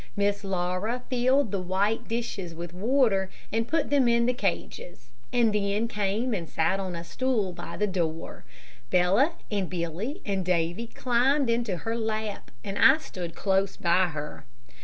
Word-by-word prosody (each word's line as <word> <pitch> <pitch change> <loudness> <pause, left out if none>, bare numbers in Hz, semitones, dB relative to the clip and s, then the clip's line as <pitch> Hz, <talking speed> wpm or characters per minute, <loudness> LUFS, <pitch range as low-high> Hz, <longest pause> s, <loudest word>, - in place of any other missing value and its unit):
Miss 205 0 +1
Laura 190 +6 -1
filled 255 -1 +3
the 200 - -1
little 180 -1 -7
white 205 +5 +1
dishes 210 -7 -3
with 170 +1 -7
water 210 -2 +2 0.2
and 225 +1 0
put 305 +1 0
them 275 -4 +4
in 235 0 +4
the 250 - +2
cages, 175 - -4 0.2
and 230 -3 +3
then 205 +2 +1
came 210 +3 -1
and 170 -5 -3
sat 165 +4 +1
on 185 -2 -3
a 170 - -5
stool 210 0 -1
by - - -7
the 210 - +2
door. 170 -5 -3 0.5
Bella, 195 - +4 0.2
and 200 -3 -1
Billy, 185 - -3
and 195 -2 -1
Davy 175 +5 0
climbed 255 +3 +2
into 230 -6 0
her 225 +6 -3
lap, 220 -2 -3
and 195 0 -4
I 270 +3 +8
stood 175 - -7
close 195 -1 +1
by 180 +2 +3
her. 150 -3 -6
200 Hz, 165 wpm, -27 LUFS, 180-235 Hz, 0.5 s, I